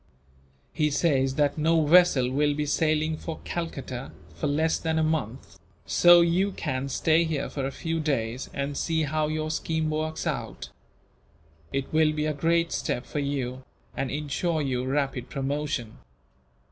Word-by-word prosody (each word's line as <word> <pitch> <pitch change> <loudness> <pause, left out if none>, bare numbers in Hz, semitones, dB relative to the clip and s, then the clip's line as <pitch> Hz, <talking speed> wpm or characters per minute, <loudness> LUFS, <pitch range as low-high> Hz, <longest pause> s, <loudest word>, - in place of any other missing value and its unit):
"He 150 -1 +1
says 135 -3 +1
that 145 0 +1
no 160 0 +3
vessel 150 -6 +5
will 145 +2 +2
be 150 0 -1
sailing 155 +1 +1
for 160 0 -6
Calcutta 135 -7 -5 0.2
for 85 - -3
less 160 +3 +1
than 160 -1 -1
a 160 - +2
month, 145 -6 -3 0.3
so 175 0 +7
you 180 +4 +2
can 130 -3 -3
stay 160 +5 +3
here 155 -4 -2
for 135 -2 -2
a - - -4
few 165 +3 -3
days, 130 -5 -2
and 140 +1 -3
see 160 +1 0
how 155 +1 0
your 155 0 -2
scheme 160 0 -1
works 155 +1 -2
out. - - -4 1.0
It 135 +2 -3
will 155 -1 +4
be 150 0 -1
a 155 - 0
great 165 +3 +1
step 125 - -2
for 150 - -4
you, 130 -2 -3 0.3
and 135 - -2
ensure 150 +3 -1
you 125 -2 -1
rapid 135 -2 -1
promotion." 140 - -3
150 Hz, 160 wpm, -26 LUFS, 135-160 Hz, 1.0 s, so